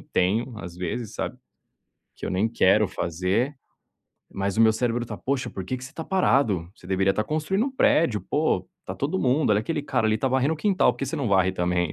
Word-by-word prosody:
tenho, 110 +7 0
às 85 -3 -8
vezes, 95 +5 -4
sabe. - - -4 0.8
Que - - -7
eu - - -2
nem 100 +5 +1
quero 105 -1 +4
fazer, 95 - -1 0.8
mas 100 0 -2
o - - +3
meu 110 -1 +6
cérebro 120 +1 -1
tá: 105 - -6
"Poxa, 130 -2 -2
porque 95 +7 -4
que 130 - -9
você 135 - -9
está 160 - -6
parado? 125 - +2
Você 90 - -16
deveria 95 +1 +2
estar 110 +2 -1
construindo 160 - 0
um - - -2
prédio, 155 - +3
pô, 95 - 0 0.2
tá 95 - -4
todo 145 - -2
mundo, 135 +1 +2
olha 105 0 +4
aquele 150 +4 -2
cara 125 -6 0
ali, 110 - +2
está 135 - 0
varrendo 130 +4 +1
o - - -9
quintal, 195 +2 +2
por 135 - -4
você 140 - -4
não 135 -5 -1
varre 95 -1 +3
também.", 90 -3 0
115 Hz, 215 wpm, -25 LUFS, 95-140 Hz, 0.8 s, meu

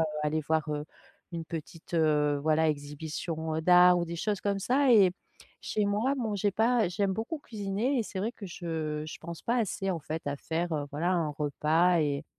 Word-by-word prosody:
heu, - - +4 0.2
aller 150 +1 0
voir, 160 -1 +1
heu, 150 0 -2 0.5
une 165 -1 -4
petite, 165 +1 -8
heu, 150 -3 +3
voilà, 160 +1 +3
exhibition, 155 +2 -4
heu, 160 - 0
d'art 180 +1 +7
ou 170 - 0
des 170 +1 -5
choses 205 +3 -1
comme 200 -1 0
ça 260 +6 +2
et 195 -5 +7 0.5
chez 210 - 0
moi, 215 +7 +1
bon 220 -4 -1
j'ai 205 +1 +1
pas 225 0 +2
j'aime 195 +2 0
beaucoup 230 - -3
cuisiner 220 +1 -2
et - - +2
c'est 205 - -6
vrai 215 +5 -1
que 220 - -10
je 160 -4 -4
je 155 - -8
pense 170 0 -7
pas 235 - 0
assez, 195 -4 -1
en 170 -3 -2
fait, 155 +2 -5
à 145 0 -1
faire, 165 +4 -2
heu, 145 -1 -1
voilà, 170 +5 0
un 165 -4 +1
repas 155 +4 +2
et 145 0 -1
170 Hz, 210 wpm, -29 LUFS, 155-205 Hz, 0.5 s, d'art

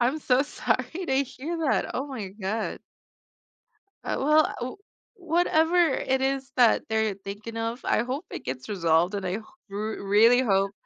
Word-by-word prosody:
I'm 255 +6 +1
so 260 -2 +3
sorry 340 +4 -2
to 270 +1 +2
hear 305 +6 -6
that, - - 0
oh 270 +3 -2
my 235 -8 -5
god. 210 +2 -4 1.2
Uh, - - -2
well, 305 +3 +3
u 250 +8 -4 0.4
whatever 340 -2 +2 0.2
it 265 0 0
is 270 0 -1
that 245 -3 +5
they're 220 -1 +1
thinking 205 +4 -8
of, 230 +2 -3
I 230 - +2
hope 270 +8 -4
it - - -7
gets 130 0 -5
resolved 175 -1 +2
and 200 -2 -3
I 180 - -2
h 205 - -2 0.3
r 200 - -6 0.2
really 215 +5 +5
hope 195 -4 +2
240 Hz, 165 wpm, -26 LUFS, 200-275 Hz, 1.2 s, that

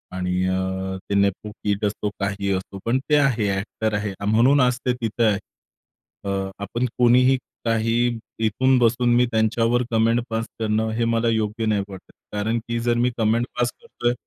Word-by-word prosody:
आणि 90 0 -1
अ, 95 0 -2
ते 100 - 0
नेपो-किड 100 +1 0
असो, 105 0 -2
काही 100 0 -1
असो 95 +1 -5
पण 125 +3 +2
ते 150 - +5
आहे, 125 -7 +2
ॲक्टर 110 +2 -3
आहे 105 -1 -2 0.2
म्हणून 130 +6 +5
आज 125 -1 +2
ते 125 - +2
तिथं 115 -1 -2
आहे. 100 -2 +2 0.8
अ, 95 -1 -2
आपण 120 +5 -2
कोणीही 125 +2 +5 0.3
काही 115 0 +1 0.5
इथून 130 +5 +2
बसून 120 +1 +3
मी 125 +1 +4
त्यांच्यावर 115 +2 +2
कमेंट 115 +1 +3
पास 115 0 -2
करणं 110 0 0
हे 115 - +1
मला 115 0 +1
योग्य 110 0 -1
नाही 105 -2 +1
वाटत. 95 -2 -12 0.2
कारण 110 +3 0
की 115 0 -1
जर 120 0 +1
मी 125 +1 +2
कमेंट 115 +2 +2
पास 120 0 +2
करतोय, 120 - -2
110 Hz, 170 wpm, -23 LUFS, 100-120 Hz, 0.8 s, ते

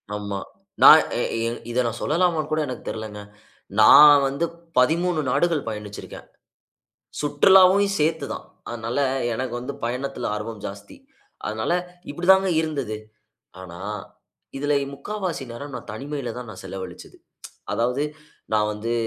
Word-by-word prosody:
ஆமா. 100 -1 -4 0.4
நான் - - +10 0.2
எ - - +1 0.2
இ - - 0 0.3
இத 125 +1 +1
நான் 115 -1 -3
சொல்லலாமான்னுகூட 155 -1 +1
எனக்கு 125 - -6
தெரிலங்க. 110 -2 -5 0.6
நான் 145 +6 +9
வந்து 140 +5 -1 0.3
13 165 +5 +2
நாடுகள் 160 +3 +1
பயணிச்சிருக்கேன். 105 -2 -8 0.9
சுற்றுலாவையும் 190 +6 +5
சேர்த்து 160 +2 +1
தான். - - -8 0.2
அதனால 115 +1 -4 0.4
எனக்கு 125 +1 -3
வந்து 130 +3 -5
பயணத்தில 125 +1 -3
ஆர்வம் 105 0 -6
ஜாஸ்தி. 100 +1 -9 0.5
அதனால - - -2 0.4
இப்பிடிதாங்க 190 +5 +4
இருந்தது. 140 -9 -3 0.6
ஆனா, 85 -2 -10 0.8
இதில 145 +1 0
இ - - -9
முக்காவாசி 185 +2 -4
நேரம் 140 +4 -8
நான் 105 - -7
தனிமையில 135 +1 -5
தான் 125 - -8
நான் - - -10
செலவழிச்சது. 95 -2 -8 0.6
அதாவது, 125 +4 0 0.5
நான் 105 0 +2
வந்து 110 +3 -3
135 Hz, 125 wpm, -23 LUFS, 110-155 Hz, 0.9 s, நான்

